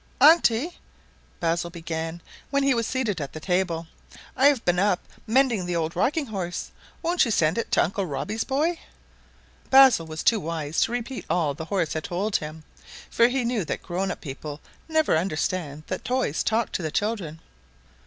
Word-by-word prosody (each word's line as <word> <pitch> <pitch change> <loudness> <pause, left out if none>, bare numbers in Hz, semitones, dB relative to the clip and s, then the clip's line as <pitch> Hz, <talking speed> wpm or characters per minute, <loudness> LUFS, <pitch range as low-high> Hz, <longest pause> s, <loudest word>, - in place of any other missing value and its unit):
"Auntie," 305 0 +5 0.6
Basil 170 0 0
began, 165 0 -5 0.3
when 280 0 +1
he 275 -1 +4
was 230 -2 0
seated 225 -10 -1
at 140 - -5
the 155 - -6
table, 175 -1 0 0.5
"I 270 - +5
have 280 -5 +2
been 180 +2 +3 0.3
mending 240 -2 +3
up 175 - -5
the 175 - -1
old 165 0 -1
rocking 300 +2 +1
horse; 190 -6 -4 0.3
won't 345 +2 +3
you 240 - 0
send 165 -2 +2
it - - -3
to - - +5
Uncle 195 +2 -2
Robbie's 210 +10 -2
boy?" 310 +6 0 0.9
Basil 265 -11 +7
was 155 0 -5
too 225 - +4
wise 160 -3 -2
to - - +2
repeat 245 +2 -4
all 160 -5 +1
the 160 +3 -7
old - - -21
horse 185 -6 0
had 155 - -3
told 195 +4 0
him, 155 +1 -8 0.5
for 235 - +5
he 250 0 -1
knew 235 -4 0
that - - -4
grown 185 +2 -2
up - - -5
people 145 0 -7 0.3
never 315 - +3
understand 160 -2 -2
that 185 - -4
toys 250 - 0
talk 225 +1 0
to - - -2
the 160 - -2
children. 185 -4 -2
190 Hz, 185 wpm, -25 LUFS, 165-245 Hz, 0.9 s, Basil